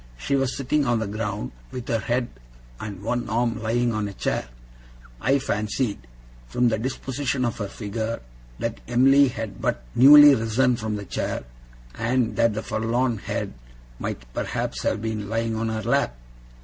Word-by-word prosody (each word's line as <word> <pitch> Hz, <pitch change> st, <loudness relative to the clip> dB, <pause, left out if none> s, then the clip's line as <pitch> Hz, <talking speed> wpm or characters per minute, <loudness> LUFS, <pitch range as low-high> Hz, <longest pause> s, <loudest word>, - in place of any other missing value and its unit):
She 100 Hz, -, -1 dB
was 135 Hz, -1 st, 0 dB
sitting 140 Hz, +2 st, +1 dB
on 120 Hz, -1 st, +3 dB
the 110 Hz, -, -1 dB
ground, 105 Hz, -, -3 dB, 0.2 s
with 125 Hz, -2 st, -7 dB
her 115 Hz, -3 st, +1 dB
head 120 Hz, +2 st, -1 dB, 0.5 s
and 100 Hz, -3 st, -7 dB
one 120 Hz, +2 st, -1 dB
arm 115 Hz, 0 st, 0 dB
lying 120 Hz, +1 st, +1 dB
on 105 Hz, -1 st, -1 dB
a 100 Hz, -, -7 dB
chair. 80 Hz, -, -2 dB, 0.7 s
I 135 Hz, -, +3 dB
fancied, 105 Hz, -, -2 dB, 0.4 s
from 120 Hz, -, +2 dB
the 110 Hz, -1 st, 0 dB
disposition 130 Hz, +1 st, -2 dB
of 120 Hz, -, -2 dB
her 105 Hz, -, -2 dB
figure, 110 Hz, +3 st, -4 dB, 0.4 s
that 115 Hz, 0 st, -3 dB
Em'ly 135 Hz, +3 st, +5 dB
had 115 Hz, -5 st, -5 dB
but -, -, -1 dB
newly 145 Hz, +3 st, +10 dB
risen 120 Hz, +2 st, +2 dB
from 110 Hz, -2 st, -3 dB
the 100 Hz, -1 st, -5 dB
chair, -, -, -3 dB, 0.5 s
and 120 Hz, +1 st, 0 dB
that 115 Hz, -2 st, +3 dB
the 110 Hz, -, -3 dB
forlorn 115 Hz, +1 st, 0 dB
head -, -, -3 dB, 0.5 s
might -, -, -4 dB
perhaps -, -, -2 dB
have 110 Hz, 0 st, -1 dB
been 110 Hz, -2 st, -3 dB
lying 115 Hz, 0 st, -1 dB
on 110 Hz, 0 st, -1 dB
her 110 Hz, -1 st, -3 dB
lap. 115 Hz, -, +1 dB
115 Hz, 165 wpm, -24 LUFS, 110-125 Hz, 0.7 s, newly